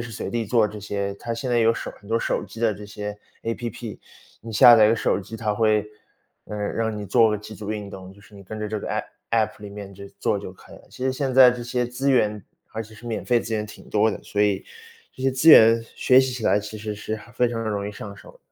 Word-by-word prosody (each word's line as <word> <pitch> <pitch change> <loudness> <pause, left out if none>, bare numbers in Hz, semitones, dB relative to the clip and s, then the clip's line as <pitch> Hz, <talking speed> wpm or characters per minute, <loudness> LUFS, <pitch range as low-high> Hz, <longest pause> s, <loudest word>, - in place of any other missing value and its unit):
时 120 0 -6
随 110 - -5
地 115 -2 -2
做 115 0 +3
这 105 0 -8
些。 100 -1 -3
它 115 +3 -4
现 120 +2 -4
在 120 - +3
有 115 0 +4
手 - - -5
很 100 - -16
多 115 +1 +1
手 - - -1
机 - - -12
的 115 -1 +2
这 105 +1 -9
些 105 0 -6 0.3
APP， 115 -1 -5 0.4
你 115 - -9
下 120 +3 +8
载 110 -2 +6
一 - - +4
个 115 - +3
手 100 - 0
机， 110 +4 -9
它 110 -2 -1
会 110 -1 +2 0.6
呃， 105 - -6
让 110 +1 -2
你 105 - -5
做 115 +3 +4
个 105 - 0
几 105 +1 -10
组 105 0 -6
运 105 -2 -5
动， 95 -1 -10
就 100 - -18
是 105 - -19
你 100 - -12
跟 110 +3 -8
着 105 - -3
这 105 0 -3
个 - - -6
APP - - -2 0.3
APP 110 -2 +2
里 105 - -7
面 100 -1 -9
就 100 +1 -11
做 105 - 0
就 100 - -7
可 - - -17
以 - - -11
了。 - - -18
其 130 - -6
实 130 - +1
现 130 -1 -2
在 130 -1 +9
这 125 -1 -5
些 125 0 -1
资 130 +3 -1
源， 105 -5 +2 0.3
而 110 - -3
且 110 0 -14
是 120 +3 -13
免 115 - -3
费 120 -1 +3
资 115 - -6
源 105 -1 -1
挺 105 - -13
多 110 +1 +3
的， - - -6
所 105 - -3
以 100 -2 +2 0.5
这 130 - -10
些 135 - +3
资 130 +5 +2
源 115 -4 +8
学 130 0 +5
习 130 -1 -1
起 120 -3 -5
来， 100 - +4
其 105 +1 -8
实 105 0 -4
是 110 +1 -4
很 115 +2 -14
非 125 - +2
常 115 -1 -3
容 105 -2 -2
易 - - -5
上 100 0 -9
手。 - - -15
110 Hz, 320 characters per minute, -24 LUFS, 105-120 Hz, 0.6 s, 在